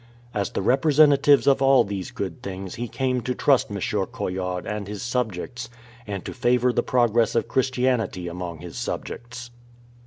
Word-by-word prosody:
As 100 -2 -1
the - - -3
representatives 145 +2 +5
of 135 -1 +4
all 135 -1 +6
these 100 -2 -5
good 95 -5 -5
things 95 -1 -6
he 120 +1 -4
came 130 0 -1
to 125 +1 -2
trust 135 -3 +3
M. 100 - -4
Coillard 95 -3 -2
and 105 -1 -4
his 105 +4 -5
colleagues, 125 0 -3 0.4
and 100 -3 -5
to - - -5
favour 125 0 +2
the - - +2
progress 120 -2 +2
of 115 - +1
Christianity 125 -8 0
among 85 -2 -6
his 85 -2 -9
subjects. 120 0 -6
120 Hz, 160 wpm, -24 LUFS, 95-125 Hz, 0.4 s, all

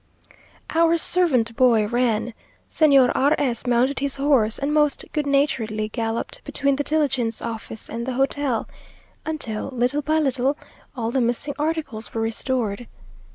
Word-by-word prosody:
Our 335 +1 +3
servant 270 -11 +2
boy 235 -4 +4
ran 235 0 0 0.3
Señor 275 -5 +4
R 285 +3 +3
s 250 -3 -2
mounted 250 +3 +2
his 280 0 0
horse, 270 -6 +2
and 280 +2 -2
most 295 -1 +1
good 300 -2 -1
naturedly 230 -7 0
galloped 225 0 -3
between 280 -1 0
the 290 - 0
diligence 270 -7 0
office 225 -1 -6
and 235 +2 -5
the 260 - -2
hotel, 270 -2 0 0.6
until, 250 -9 -2
little 255 +3 0
by 310 +2 0
little, 275 -1 +1 0.4
all 230 -2 -2
the 265 - +1
missing 245 +5 +1
articles 300 -9 -3
were 225 - -1
restored. 225 -1 -2
260 Hz, 145 wpm, -22 LUFS, 230-290 Hz, 0.6 s, boy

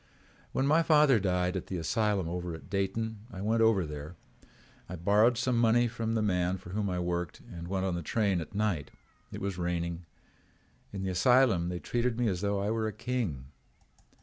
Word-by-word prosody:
"When 135 - 0
my 155 +4 +4
father 150 -6 +5
died 90 -1 0
at 95 - -4
the 95 - -3
asylum 100 +2 0
over 85 0 -4
at 80 - -13
Dayton, 105 +3 -2
I 95 -1 -7
went 110 +3 +1
over 110 -5 +4
there. 75 +2 -7 0.7
I 90 - -5
borrowed 105 +7 +3
some 125 +1 +1
money 120 +1 +4
from 115 -1 -2
the 110 - +1
man 90 -2 +1
for 90 - -11
whom 100 0 -1
I 90 - -2
worked 90 -1 -3
and 85 0 -7
went 95 +1 -1
on 95 - 0
the 85 - -2
train 100 0 0
at 90 - -9
night. 100 -8 0 0.4
It - - -7
was 95 -2 -3
raining. 85 -1 -2 0.8
In 100 -1 -5
the 95 - -1
asylum 110 -3 +4
they 90 - -3
treated 120 +5 -1
me 120 - +2
as 90 -2 -2
though 100 -1 0
I 105 - 0
were 110 -1 0
a - - -2
king. 105 - -3
100 Hz, 200 wpm, -30 LUFS, 90-115 Hz, 0.8 s, father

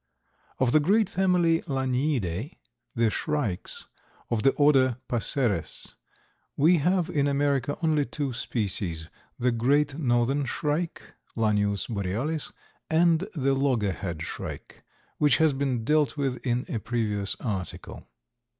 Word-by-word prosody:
_) - - -55 0.6
Of 130 -2 +2
the 155 - +5
great 200 +7 +2
family 180 -3 +2
Laniidae, 130 - -1 0.4
the 115 -2 +2
shrikes, 145 - -3 0.5
of 115 -2 +1
the 135 - +5
order 135 -4 +4
Passeres, 115 - -1 0.6
we 165 +5 +5
have 175 +2 +1
in 145 -1 +1
America 140 -1 0
only 155 -3 +2
two 140 -3 -3
species, 95 -9 -3 0.3
the 125 +1 +1
Great 140 +5 +1
Northern 130 +1 +1
Shrike, 150 +6 -3 0.2
Lanius 105 -3 +1
borealis, 115 - -2 0.4
and 165 +3 +3
the 135 -2 +1
loggerhead 105 - -1
shrike, - - -7 0.4
which 145 -5 +4
has 160 -2 +3
been 135 -4 -1
dealt 150 0 +2
with 135 -3 -2
in 125 -1 0
a 115 - -3
previous 105 -3 -1
article. 95 -7 -5
135 Hz, 125 wpm, -27 LUFS, 115-150 Hz, 0.6 s, the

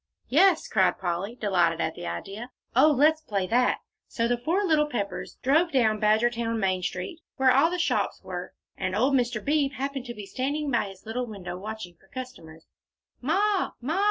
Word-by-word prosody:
"Yes," 345 +4 +4
cried 190 -3 +2
Polly, 185 +5 -3
delighted 175 -7 +1
at 160 - 0
the 85 - -7
idea. 195 - -6 0.3
"Oh, 275 +5 +7
let's 305 +2 +4
play 200 -10 -1
that!" 245 +5 +2 0.3
So 230 -1 -1
the 245 - +2
four 335 +11 +1
little 310 -5 +3
Peppers 205 -8 -4
drove 320 +6 +3
down 220 -6 +2
Badgertown 230 +2 +2
main 190 -3 0
street, 180 - -4 0.2
where 265 -1 +4
all 275 +6 +5
the 360 - -2
shops 340 - 0
were, - - -6 0.2
and 185 -1 -2
old 255 +6 +2
Mr. 240 -4 0
Beebe 285 -2 +1
happened 270 -1 -3
to 240 -1 -6
be 210 -1 -7
standing 280 +6 -2
by 235 - +2
his 195 0 -11
little 245 +3 -3
window 185 -5 -6
watching 195 -3 -7
for 190 - -26
customers. 195 -11 -9 0.6
"Ma 385 +8 +1
Ma!" 310 +10 -1
240 Hz, 185 wpm, -27 LUFS, 195-280 Hz, 0.6 s, Oh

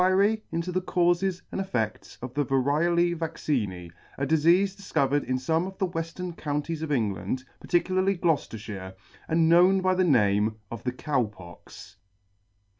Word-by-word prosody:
AN 200 +4 +3
INTO 170 +2 -2
THE 185 +1 0
CAUSES 180 +1 +1
AND - - -2
EFFECTS 110 - -3
OF 125 -1 -6
THE 145 - +1
VARIOLA 155 +6 +2
VACCINE, 115 - -3 0.3
A 140 - -1
DISEASE 170 +6 +3
DISCOVERED 145 -7 0
IN 130 - 0
SOME 160 +7 0
OF 190 0 -9
THE 195 - +1
WESTERN 175 +1 -4
COUNTIES 150 +1 -3
OF 160 -2 -3
ENGLAND, 120 +1 -1 0.2
PARTICULARLY 185 +2 +1
GLOUCESTERSHIRE, 110 - -2 0.3
AND 165 0 +3
KNOWN 180 +3 +5
BY 185 0 +2
THE 185 0 +2
NAME 105 - +3 0.2
OF 115 0 -7
THE 125 - +1
COW 130 -1 0
POX. 90 -5 -13
160 Hz, 150 wpm, -27 LUFS, 125-180 Hz, 0.3 s, KNOWN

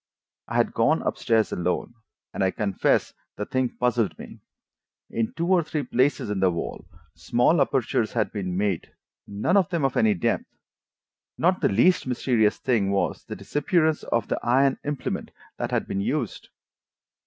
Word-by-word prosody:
I - - -5
had - - +2
gone - - +2
up - - -2
stairs 110 -1 +2
alone, 90 +6 -2 0.4
and 95 - -1
I 95 - +3
confess 100 0 0 0.2
the 105 - -4
thing 130 +1 0
puzzled 120 -3 +1
me: - - -11 0.7
in 115 -1 -1
two 170 - -2
or 180 0 +4
three 150 -1 -3
places 130 -4 +1
in 100 - -1
the 95 -1 +4
wall 85 -1 -5 0.3
small 125 +7 +2
apertures 120 -4 0
had 110 -3 0
been 90 -4 -3
made, 100 -4 -2 0.3
none 100 - 0
of 190 -4 +3
them 170 -5 0
of 135 - 0
any 110 -2 +3
depth. 85 - 0 0.9
Not - - +2
the - - +3
least 130 - +3
mysterious 120 -4 +1
thing 115 -7 +1
was 100 0 -1
the - - -6
disappearance 155 - +1
of 115 -3 -1
the - - -1
iron 135 +3 +2
implement 145 -2 -3 0.3
that - - -2
had - - 0
been 95 - -2
used. 125 +2 -3
120 Hz, 165 wpm, -25 LUFS, 100-140 Hz, 0.9 s, or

